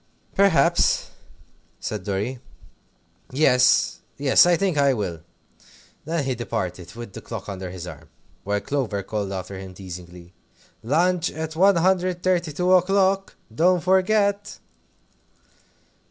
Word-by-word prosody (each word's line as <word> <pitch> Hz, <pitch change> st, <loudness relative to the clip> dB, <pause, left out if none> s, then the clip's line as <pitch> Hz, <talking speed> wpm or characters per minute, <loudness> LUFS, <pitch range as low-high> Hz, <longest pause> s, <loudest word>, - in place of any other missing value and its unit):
"Perhaps," 175 Hz, -3 st, +3 dB, 0.7 s
said 105 Hz, -3 st, -5 dB
Dorry; 105 Hz, +6 st, -3 dB, 0.9 s
"yes, 125 Hz, -2 st, +3 dB, 0.2 s
I 145 Hz, +5 st, +5 dB
think 190 Hz, -1 st, 0 dB
I 140 Hz, -2 st, +3 dB
will." 95 Hz, -7 st, -3 dB, 0.9 s
Then 165 Hz, -1 st, -1 dB
he 135 Hz, -1 st, -1 dB
departed 95 Hz, -6 st, -5 dB
with 115 Hz, -4 st, -9 dB
the -, -, -8 dB
clock 115 Hz, -5 st, -7 dB
under 95 Hz, -2 st, -6 dB
his 90 Hz, -1 st, -8 dB
arm, 80 Hz, -3 st, -11 dB, 0.3 s
while 100 Hz, 0 st, -1 dB
Clover 120 Hz, -8 st, -2 dB
called 100 Hz, 0 st, -3 dB
after 95 Hz, 0 st, -6 dB
him 95 Hz, -1 st, -10 dB
teasingly, 90 Hz, -1 st, -10 dB, 0.5 s
"Lunch 175 Hz, +7 st, +1 dB
at 160 Hz, 0 st, -6 dB
132 180 Hz, -1 st, +2 dB
o'clock; 195 Hz, +1 st, +2 dB, 0.2 s
don't 175 Hz, +7 st, +3 dB
forget!" 200 Hz, +2 st, +1 dB
135 Hz, 110 wpm, -23 LUFS, -, 0.9 s, I